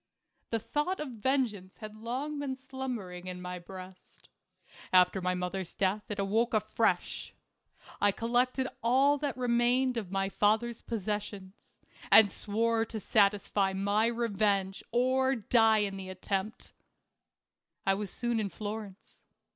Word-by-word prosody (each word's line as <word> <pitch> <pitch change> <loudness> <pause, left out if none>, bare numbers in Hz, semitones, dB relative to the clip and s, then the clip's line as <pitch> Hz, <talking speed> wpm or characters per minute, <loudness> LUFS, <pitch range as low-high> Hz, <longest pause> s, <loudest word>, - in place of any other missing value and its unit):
The 230 - 0
thought 295 - -2
of 300 - -4
vengeance 230 -5 -1
had 215 -1 -9
long 260 +7 -4
been 275 -2 -2
slum 265 -1 -5
bering 180 -4 -8
in 180 0 -5
my 180 0 -5
breast. 185 +1 -12 0.6
After 185 +1 +5
my 180 0 0
mother's 180 0 -4
death 200 +2 0
it 210 - -3
awoke 220 +4 +1
afresh. 215 +1 0 0.7
I 205 - +5
collected 245 +4 0
all 270 +5 +4
that 285 -3 -2
remained 245 +1 +2
of 210 -5 -3
my 195 0 0
father's 220 +4 +1
possessions, 205 -2 -5 0.3
and 210 -3 +8
swore 225 +2 0
to 225 0 -5
satisfy 200 -1 +2
my 200 +3 +2
revenge 205 -4 0
or 260 +2 +2
die 225 -2 +4
in 195 -1 -4
the 190 -1 -7
attempt. 195 +4 -4 1.1
I 195 - +4
was 200 0 -3
soon 240 +3 -1
in 205 -2 -1
Florence. 205 -1 -7
215 Hz, 135 wpm, -30 LUFS, 195-240 Hz, 1.1 s, and